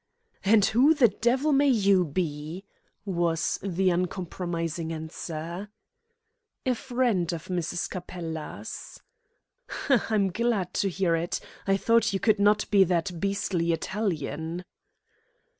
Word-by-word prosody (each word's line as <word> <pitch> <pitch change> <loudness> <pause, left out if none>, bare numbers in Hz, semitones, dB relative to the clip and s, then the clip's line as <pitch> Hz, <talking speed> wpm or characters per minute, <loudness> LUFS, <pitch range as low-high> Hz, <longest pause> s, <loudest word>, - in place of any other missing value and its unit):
"And 205 0 +5
who 270 +8 +4
the 255 -6 +5
devil 245 +8 +1
may 280 +1 +4
you 200 -6 +4
be?" 155 +2 -3 0.4
was 170 -3 0
the 190 -1 +1
uncompromising 175 -2 -2
answer. 165 +3 -6 1.0
"A 255 - +3
friend 240 - 0
of 165 0 -6
Mrs. 175 0 -2
Capella's." 170 -3 -7 0.9
"H'm! 270 -5 +4
I'm 200 -4 +2
glad 210 -3 0
to 195 - +1
hear 180 -2 +1
it. 165 +1 -2 0.3
I 195 0 +3
thought 230 +1 +3
you 195 - 0
could 215 0 +3
not 205 0 +4
be 200 -2 +7
that 175 0 -1
beastly 195 -3 0
Italian." 165 -2 -3
185 Hz, 120 wpm, -27 LUFS, 170-210 Hz, 1.0 s, be